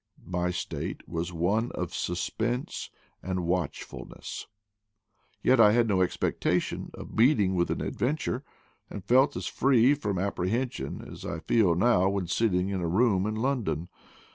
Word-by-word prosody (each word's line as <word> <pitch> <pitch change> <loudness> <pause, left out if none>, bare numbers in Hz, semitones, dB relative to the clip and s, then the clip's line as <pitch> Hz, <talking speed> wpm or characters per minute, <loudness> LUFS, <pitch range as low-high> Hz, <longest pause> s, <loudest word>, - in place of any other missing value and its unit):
My 90 0 -1
state 90 -2 -4
was 85 +2 -3
one 100 +8 0
of 90 -1 -4
suspense 115 +8 -2 0.3
and 90 -2 -2
watchfulness: 85 -3 -4 1.0
yet 130 -1 +4
I 105 -2 +7
had 120 0 +3
no 95 -3 +2
expectation 90 - 0
of - - -9
meet 125 +5 +5
ing 95 -2 +2
with 85 -1 +1
an - - -1
adventure, 135 0 -1 0.5
and 100 - -8
felt 135 +4 +4
as - - -4
free 130 0 +4
from 105 -10 -2
ap 100 +3 -2
prehension 120 +8 -2
as - - -10
I 85 - -4
feel 90 +1 +2
now 95 -1 +4
when 100 -2 -1
sitting 95 0 +1
in 95 -2 -2
a 85 - -1
room 100 +1 +2
in 110 - -2
London. 110 - -1
100 Hz, 155 wpm, -28 LUFS, 90-120 Hz, 1.0 s, I